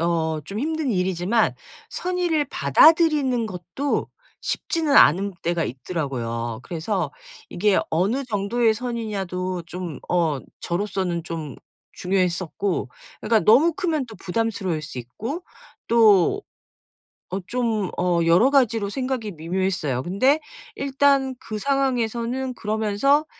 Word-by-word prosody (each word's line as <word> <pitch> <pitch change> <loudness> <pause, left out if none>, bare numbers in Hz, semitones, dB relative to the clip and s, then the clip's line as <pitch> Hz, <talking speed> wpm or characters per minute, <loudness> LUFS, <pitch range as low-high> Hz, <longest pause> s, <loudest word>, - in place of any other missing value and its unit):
어 160 -2 0
좀 200 +2 -6
힘든 315 -2 -1
일이지만 190 +3 +1 0.4
선의를 350 -5 0
받아들이는 265 - +4
것도 185 - -3 0.3
쉽지는 315 -4 0
않은 190 +5 +5
때가 170 -1 0
있더라고요. 120 -5 -4
그래서 170 -2 -2 0.4
이게 200 +2 +2
어느 205 +12 +1
정도의 225 +1 +1
선의냐도 195 -7 -3
좀 175 -4 -6
어 160 -6 +1 0.2
저로서는 180 -2 -2
좀 160 -5 -6 0.4
중요했었고 185 -2 -1 0.3
그러니까 220 0 +3
너무 315 +10 +6
크면 315 -7 -1
또 225 - -11
부담스러울 190 -4 -2
수 130 - -7
있고 225 - -6 0.4
또 225 - +4 0.9
어 190 - -3
좀 225 -6 -1
어 175 -1 +2
여러 175 +11 +5
가지로 230 -7 +2
생각이 255 -2 -3
미묘했어요. 165 -5 -2
근데 255 - +3 0.4
일단 275 -1 +2
그 215 -2 -5
상황에서는 255 -1 -1
그러면서 220 +8 +1
205 Hz, 265 characters per minute, -23 LUFS, 175-255 Hz, 0.9 s, 너무